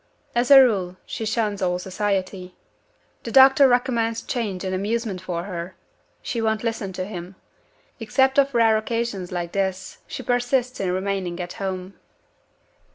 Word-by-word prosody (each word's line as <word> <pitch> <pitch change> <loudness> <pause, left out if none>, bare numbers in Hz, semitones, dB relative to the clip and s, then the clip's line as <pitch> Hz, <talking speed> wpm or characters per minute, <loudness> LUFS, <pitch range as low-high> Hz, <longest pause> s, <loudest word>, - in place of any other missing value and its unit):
As 240 +1 +1
a 275 -1 +10
rule, 195 -8 +2
she 225 - -5
shuns 215 -3 -1
all 180 -1 +1
society. 190 -1 -3 0.7
The 230 - -6
doctor 270 +2 +7
recommends 240 -3 +1
change 210 -7 -3
and 190 -1 -3
amusement 205 0 -2
for 175 -2 -4
her. 180 -1 -6 0.5
She 235 - -3
won't 220 -1 0
listen 225 -4 -2
to 185 0 -4
him. 185 -2 -8 0.6
Except 265 +4 +2
on 275 - +5
rare 225 -3 +4
occasions 220 -4 -3
like 175 -1 -3
this, 190 -1 -3
she - - -6
persists 245 +1 0
in 185 -2 -1
remaining 185 -2 -2
at 175 0 -5
home." 190 0 -5
205 Hz, 150 wpm, -23 LUFS, 185-235 Hz, 0.7 s, a